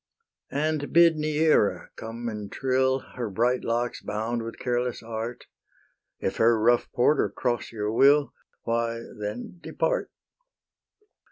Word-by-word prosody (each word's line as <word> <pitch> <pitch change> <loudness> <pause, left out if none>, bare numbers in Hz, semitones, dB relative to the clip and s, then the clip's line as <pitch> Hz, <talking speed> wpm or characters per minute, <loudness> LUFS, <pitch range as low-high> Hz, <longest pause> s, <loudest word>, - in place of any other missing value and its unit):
And 150 0 -1
bid 170 -1 +6
Neaera 155 -6 +2
come 115 +1 -6
and 105 -3 -5
trill, 130 0 +1
Her 120 -3 -3
bright 120 +5 +1
locks 120 +1 -1
bound 110 +3 -2
with 115 0 -7
careless 125 -1 -2
art: 115 +1 -5 0.7
If - - -2
her 115 0 +4
rough 120 +2 +3
porter 135 +4 +3
cross 120 -2 -2
your 105 -1 -2
will, 140 +5 +4 0.3
Why 115 0 -1 0.2
then 105 +11 -5
depart. - - -1
120 Hz, 120 wpm, -26 LUFS, 115-135 Hz, 0.7 s, bid